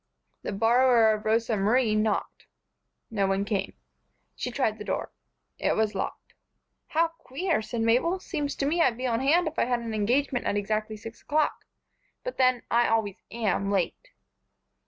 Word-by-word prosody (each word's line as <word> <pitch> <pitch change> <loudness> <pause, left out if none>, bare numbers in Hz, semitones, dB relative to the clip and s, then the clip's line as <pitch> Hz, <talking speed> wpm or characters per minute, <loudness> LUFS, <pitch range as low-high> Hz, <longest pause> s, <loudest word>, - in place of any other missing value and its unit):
The - - -4
borrower 230 +2 +4
of 215 0 -5
Rosa 225 +1 +2
Marie 215 +3 +2
knocked. 215 -1 -1 0.6
No 200 -3 +1
one 195 +1 0
came. 200 -2 -2 0.6
She - - -3
tried 235 -4 -1
the - - -5
door. - - -3 0.5
It - - +1
was 215 -1 +1
locked. 195 - -5 0.5
"How 330 +1 +2
queer!" 330 0 -2
said 225 +1 -4
Mabel. 245 +11 +2
"Seems 295 -6 -3
to 275 - -1
me 330 +4 +1
I'd 235 -8 +3
be 255 - -4
on 230 -2 +1
hand 320 +6 +3
if 315 - -3
I - - +3
had 245 -1 0
an 230 -1 -5
engagement 245 +5 +1
at 205 - +1
exactly 215 +1 -2
six 225 +2 -10
o'clock. 305 0 0 0.6
But - - -5
then, 255 -2 +3
I 240 +1 +4
always 220 -4 0
am 205 -4 0
late." 200 - -1
230 Hz, 170 wpm, -27 LUFS, 215-265 Hz, 0.6 s, borrower